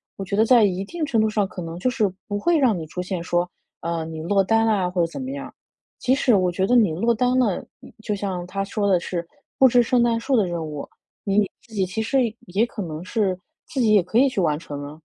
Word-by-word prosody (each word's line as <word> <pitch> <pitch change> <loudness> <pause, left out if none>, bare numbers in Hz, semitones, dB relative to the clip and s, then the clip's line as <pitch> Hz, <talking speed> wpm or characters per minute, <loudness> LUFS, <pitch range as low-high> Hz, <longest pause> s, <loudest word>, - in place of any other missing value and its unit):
我 195 - -6
觉 195 - -2
得 215 - +4
在 240 -1 +6
一 190 -2 +1
定 315 +10 -4
程 235 -6 +1
度 220 - +2
上， 210 -2 0
可 185 - -8
能 165 0 -6
就 220 +8 0
是 220 -6 +1 0.2
不 205 -1 -2
会 340 +9 +2
让 250 -9 +3
你 165 - -5
出 180 +4 -5
现 180 -2 -4
说， 175 0 0 0.3
呃， 165 0 -2
你 160 0 -7
落 195 +4 +2
单 225 +3 +2
啦， 200 -5 +1
或 180 -1 0
者 - - +1
怎 275 - -6
么 260 +1 -4
样。 280 0 -7 0.5
即 255 - +2
使 260 -3 +3
我 185 -2 +2
觉 190 +2 0
得 245 - +3
你 220 -8 +5
落 230 +9 +1
单 250 +3 +1
了， 225 -8 +2 0.2
嗯， - - -13
就 210 -2 -1
像 190 -3 -3
它 195 +2 -2
说 200 +1 -1
的 190 -3 +4
是 170 0 -4 0.3
“布 265 - +8
置 245 0 +4
圣 245 +1 +2
诞 230 -1 +2
树” 265 +3 0
的 210 - +3
任 170 -2 -3
务。 150 -2 -6 0.4
你 200 0 +2
自 225 0 -19
己 195 -3 +1
其 185 +4 -3
实 265 +5 +1 0.3
也 195 +6 +1
可 235 - -7
能 160 -3 -5
是 190 -3 0 0.3
自 290 - -4
己 225 -4 +4
也 205 - +6
可 180 +6 -2
以 270 +3 +6
去 255 - -3
完 155 -4 +1
成 145 -3 -7
啊。 150 +2 -11
200 Hz, 285 characters per minute, -23 LUFS, 180-235 Hz, 0.5 s, 布